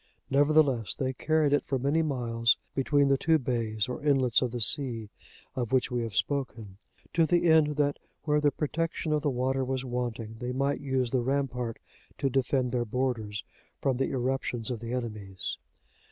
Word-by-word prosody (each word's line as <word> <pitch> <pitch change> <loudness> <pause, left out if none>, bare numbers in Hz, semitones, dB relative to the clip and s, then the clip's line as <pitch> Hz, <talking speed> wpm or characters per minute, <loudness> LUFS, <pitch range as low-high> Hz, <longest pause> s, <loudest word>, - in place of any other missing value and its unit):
Nevertheless, 140 -5 +3
they 130 -1 -1
carried 155 +1 +1
it 145 - +3
for 135 - -1
many 140 +5 +1
miles 115 -6 +1 0.2
between 140 +1 +2
the 135 -1 +3
two 160 -1 +4
bays 115 -6 -1
or 125 +5 -5
inlets 135 -5 +3
of 125 - 0
the 120 +1 -4
sea 115 -2 +1 0.4
of 120 -2 -2
which 130 -2 +2
we 120 -1 0
have 115 -4 -4
spoken;(76) 115 -8 -4
to 165 -1 +3
the 175 +1 +2
end 160 -3 +5
that 145 -1 +1 0.2
where 150 -1 +2
the 145 - +4
protection 160 +2 -2
of 150 - +1
the 145 - +1
water 130 +1 0
was 130 0 -2
wanting, 120 -3 -4
they 125 0 -3
might 140 +2 0
use 130 -3 0
the 130 - +2
rampart 125 -3 -1 0.4
to 135 - 0
defend 130 -1 +1
their 125 -1 0
borders 115 -3 -2 0.4
from 135 -3 0
the 135 - 0
irruptions 125 -2 -2
of 120 - -3
the 115 +1 -6
enemies. 105 -6 -4
130 Hz, 180 wpm, -29 LUFS, 120-145 Hz, 0.4 s, end